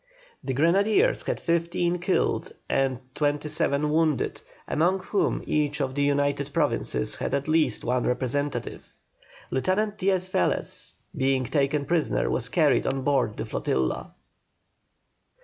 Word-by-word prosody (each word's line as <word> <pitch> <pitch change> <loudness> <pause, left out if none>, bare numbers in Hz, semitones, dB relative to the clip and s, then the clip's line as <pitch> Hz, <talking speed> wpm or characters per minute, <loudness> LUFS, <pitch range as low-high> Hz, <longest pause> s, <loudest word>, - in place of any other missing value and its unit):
The 130 - -2
grenadiers 200 - +3
had - - -2
fifteen 170 +1 0
killed 180 +2 0
and 135 -2 +1 0.2
twenty 145 +1 0
seven 150 -1 +1
wounded, 155 -2 +1 0.3
among 180 +4 +1
whom 200 +2 0
each 150 -1 0
of 135 -2 -1
the 145 - -1
United 145 0 +1
Provinces 60 - 0
had - - -1
at 140 +1 -2
least 155 -7 +2
one 125 0 0
representative. 130 +1 -3 0.5
Lieutenant 205 +9 0
Diaz 185 -2 +1
Velez, 90 - -1 0.2
being 135 -1 +1
taken 140 +2 0
prisoner, 165 -2 0
was 125 0 -1
carried 150 -1 +3
on 135 0 -1
board 135 -6 +1
the - - -3
flotilla. 65 -1 -2
145 Hz, 130 wpm, -26 LUFS, 135-170 Hz, 0.5 s, grenadiers